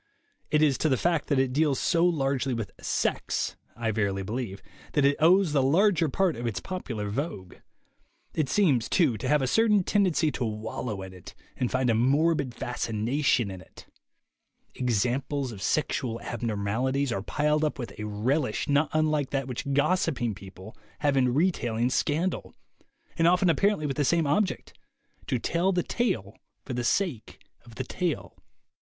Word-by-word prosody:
It 150 Hz, 0 st, +3 dB
is 140 Hz, -4 st, +3 dB
to 155 Hz, -, +2 dB
the 130 Hz, -, +2 dB
fact 170 Hz, -1 st, 0 dB
that 145 Hz, -, +1 dB
it 130 Hz, -1 st, +1 dB
deals 145 Hz, -1 st, +2 dB
so 170 Hz, -1 st, +2 dB
largely 135 Hz, -6 st, +1 dB
with 115 Hz, -4 st, -4 dB
"sex," -, -, -1 dB, 0.2 s
I 115 Hz, -2 st, -1 dB
verily 100 Hz, -3 st, -1 dB
believe, 105 Hz, -1 st, -4 dB, 0.3 s
that 145 Hz, -2 st, +3 dB
it 140 Hz, +1 st, +4 dB
owes 175 Hz, +1 st, +4 dB
the 140 Hz, -, +3 dB
larger 165 Hz, +4 st, +3 dB
part 185 Hz, +3 st, +1 dB
of 120 Hz, +1 st, -4 dB
its 110 Hz, -, -2 dB
popular 120 Hz, -, -5 dB
vogue. 105 Hz, -, -4 dB, 0.8 s
It 150 Hz, -4 st, -1 dB
seems, 140 Hz, -, +2 dB
too, 155 Hz, -10 st, +3 dB
to 130 Hz, -, -3 dB
have 150 Hz, 0 st, +3 dB
a -, -, +1 dB
certain 210 Hz, -, +3 dB
tendency 180 Hz, -6 st, +2 dB
to 130 Hz, -, -3 dB
wallow 110 Hz, -1 st, -4 dB
in 95 Hz, 0 st, -9 dB
it 90 Hz, -2 st, -12 dB, 0.2 s
and 125 Hz, -, -1 dB
find 130 Hz, 0 st, 0 dB
a 115 Hz, -, +3 dB
morbid 140 Hz, +2 st, +2 dB
fascination 120 Hz, 0 st, 0 dB
in 95 Hz, -1 st, -8 dB
it. -, -, -15 dB, 0.9 s
Examples 125 Hz, +3 st, -1 dB
of 100 Hz, -4 st, -9 dB
sexual 120 Hz, 0 st, -1 dB
abnormalities 120 Hz, +5 st, -1 dB
are 95 Hz, -, -1 dB
piled 150 Hz, +7 st, 0 dB
up 155 Hz, -, 0 dB
with 120 Hz, -3 st, -6 dB
a 105 Hz, -, -3 dB
relish 120 Hz, +5 st, -1 dB
not 145 Hz, +2 st, +2 dB
unlike 155 Hz, -3 st, +1 dB
that 135 Hz, -2 st, -2 dB
which 130 Hz, +2 st, -4 dB
gossiping 140 Hz, -, +1 dB
people 95 Hz, +1 st, -12 dB, 0.3 s
have 145 Hz, -1 st, +2 dB
in 125 Hz, -2 st, +3 dB
re 165 Hz, +9 st, +3 dB
tailing 120 Hz, -4 st, -1 dB
scandal, 165 Hz, +8 st, -1 dB, 0.6 s
and 165 Hz, -, +5 dB
often 180 Hz, 0 st, +4 dB
apparently 200 Hz, -3 st, +1 dB
with 140 Hz, -1 st, -2 dB
the 145 Hz, -, +2 dB
same 165 Hz, +3 st, +2 dB
object 185 Hz, +8 st, 0 dB, 0.3 s
— 280 Hz, -, -32 dB
to 130 Hz, -, +1 dB
tell 170 Hz, +9 st, 0 dB
the 175 Hz, -2 st, 0 dB
tale 115 Hz, -, -1 dB, 0.3 s
for 130 Hz, -, -5 dB
the 120 Hz, 0 st, -2 dB
sake 145 Hz, -, -1 dB, 0.3 s
of 120 Hz, -2 st, -15 dB
the 130 Hz, -, -3 dB
tale. 170 Hz, +5 st, -3 dB
135 Hz, 170 wpm, -27 LUFS, 115-160 Hz, 0.9 s, and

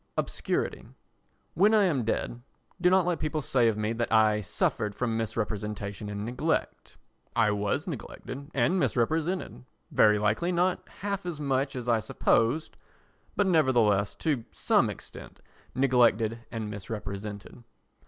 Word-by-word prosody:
Obscurity -, -, -2 dB, 0.7 s
When 205 Hz, +6 st, +4 dB
I 210 Hz, -, +5 dB
am 150 Hz, -10 st, +1 dB
dead, 120 Hz, +2 st, -2 dB, 0.4 s
do 180 Hz, -, +5 dB
not 185 Hz, -1 st, +4 dB
let 175 Hz, -3 st, 0 dB
people 155 Hz, 0 st, -2 dB
say 125 Hz, -4 st, +3 dB
of 110 Hz, -2 st, +1 dB
me 110 Hz, +1 st, -1 dB
that 115 Hz, 0 st, -2 dB
I 110 Hz, -1 st, +4 dB
suffered 105 Hz, +1 st, -1 dB
from 120 Hz, -3 st, -1 dB
misrepresentation 105 Hz, -2 st, -3 dB
and 105 Hz, 0 st, -4 dB
neglect. 125 Hz, +7 st, -2 dB, 0.4 s
I 105 Hz, -, +4 dB
was 105 Hz, 0 st, -1 dB
neglected 140 Hz, +3 st, -7 dB
and 150 Hz, +9 st, +2 dB
misrepresented; 160 Hz, -, 0 dB, 0.3 s
very 105 Hz, -1 st, +5 dB
likely 105 Hz, -, +1 dB
not 180 Hz, +1 st, 0 dB
half 200 Hz, 0 st, -2 dB
as 165 Hz, -4 st, -4 dB
much 135 Hz, -1 st, 0 dB
as 125 Hz, -1 st, -5 dB
I 115 Hz, -2 st, +3 dB
supposed 120 Hz, +7 st, +1 dB, 0.6 s
but, 205 Hz, -, +2 dB
nevertheless, 120 Hz, -, +3 dB
to 145 Hz, -8 st, -1 dB
some -, -, +2 dB
extent -, -, -10 dB, 0.4 s
neglected 120 Hz, -4 st, +3 dB
and 110 Hz, -2 st, -4 dB
misrepresented. 100 Hz, +2 st, -7 dB
120 Hz, 135 wpm, -28 LUFS, 105-155 Hz, 0.7 s, I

